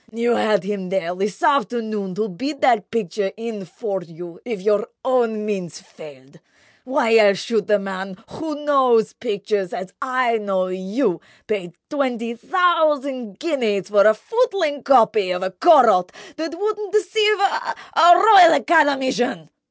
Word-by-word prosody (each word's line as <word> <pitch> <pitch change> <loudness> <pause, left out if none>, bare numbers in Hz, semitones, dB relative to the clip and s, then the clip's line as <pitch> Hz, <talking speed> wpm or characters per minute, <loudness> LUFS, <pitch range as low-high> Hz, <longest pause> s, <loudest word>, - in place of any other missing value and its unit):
You 235 +1 0
had 210 -4 +1
him 195 -2 -5
there 185 -2 -2
this 195 +1 -4
afternoon 220 -9 -1
to 215 +3 -2
bid 275 - -6
that 210 -4 +2
picture 205 -3 -3
in 225 -4 -6
for 195 +2 -5
you 170 0 -12
if 230 -4 -5
your 210 +2 0 0.2
own 230 -5 0
means 190 -6 -5
failed. 140 +1 -16 0.5
Why 255 -4 +1
else 200 -3 +4
should 215 -1 -2
the 210 - +3
man, 190 -1 -6
who 300 -2 -7
knows 250 -7 +2
pictures 205 -4 -3
as 185 +1 -7
I 255 -4 0
know 190 -3 -2
you, 185 - -2 0.2
pay 195 -6 -4
twenty 245 -5 -3
thousand 285 - 0
guineas 225 - -2
for 205 0 +4
a 215 - +4
footling 380 - -1
copy 220 -7 +3
of 180 +1 -3
a 190 - -3
Corot 225 - +4 0.3
that 325 +1 -5
wouldn't 420 -1 -3
deceive 425 +1 +2
a—a 390 -4 +2
Royal 380 -4 +7
Academician! 270 - +1
225 Hz, 145 wpm, -20 LUFS, 195-285 Hz, 0.5 s, Royal